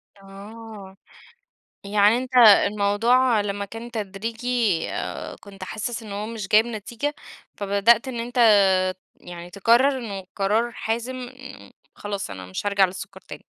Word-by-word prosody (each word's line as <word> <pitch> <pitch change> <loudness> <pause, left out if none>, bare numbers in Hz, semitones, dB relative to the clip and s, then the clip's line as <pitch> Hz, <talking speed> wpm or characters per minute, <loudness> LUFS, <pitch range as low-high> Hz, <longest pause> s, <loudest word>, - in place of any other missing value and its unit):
آه، 200 0 -12 0.9
يعني 205 +2 +3
أنت 255 0 -4
الموضوع 220 +2 +5
لمّا 200 0 -3
كان 225 +4 -9
تدريجي 225 0 -2
آآ - - -5
كنت 195 -2 -10
حاسِس 230 +3 -5
إن 210 -2 -9
هو 205 +1 -4
مش 220 -4 -6
جايب 220 +2 +5
نتيجة، 235 +6 -4 0.4
فبدأت 205 +5 +2
إن 240 -2 -4
أنت 245 +2 -5 0.8
يعني 175 0 -10
تقرّر 240 +8 +3
إنه 200 -5 -6
قرار 215 +4 +1
حازم 235 +4 -3
مم 260 +1 -10 0.3
خلاص 200 - -5
أنا 95 -1 -8
مش 95 - -6
هارجع 200 -1 +4
للسُّكَّر 185 0 -6
تاني. - - -11
215 Hz, 135 wpm, -23 LUFS, 200-235 Hz, 0.9 s, الموضوع